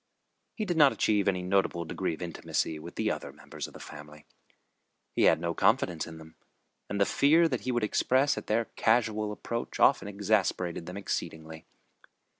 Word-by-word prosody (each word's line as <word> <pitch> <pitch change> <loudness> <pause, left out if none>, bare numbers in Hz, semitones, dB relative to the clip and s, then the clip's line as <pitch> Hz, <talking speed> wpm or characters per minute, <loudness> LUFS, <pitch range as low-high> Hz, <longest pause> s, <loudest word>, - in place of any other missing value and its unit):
He 215 - -2
did 175 -4 -1
not 145 -3 +7
achieve 105 -2 +1
any 90 -2 +1
notable 90 -2 0
degree 80 +1 -2
of 85 - -8
intimacy 80 -2 -2
with - - -10
the - - 0
other - - -5
members - - -8
of - - -16
the - - -10
family. 75 0 -11 0.9
He - - +3
had - - +5
no 85 0 -2
confidence 85 0 +1
in 80 -1 -9
them, 80 0 -13 0.6
and 100 - -2
the 100 - +4
fear 160 +9 +4
that 130 -6 -2
he 130 - -2
would 120 -2 0
express 130 +6 +2
at - - -7
their 115 +2 +1
casual 110 -2 +1
approach 115 +2 -5
often 135 -6 +4
exasperated 100 -4 0
them 90 +2 -6
exceedingly. 80 -5 -5
100 Hz, 180 wpm, -29 LUFS, 85-115 Hz, 0.9 s, not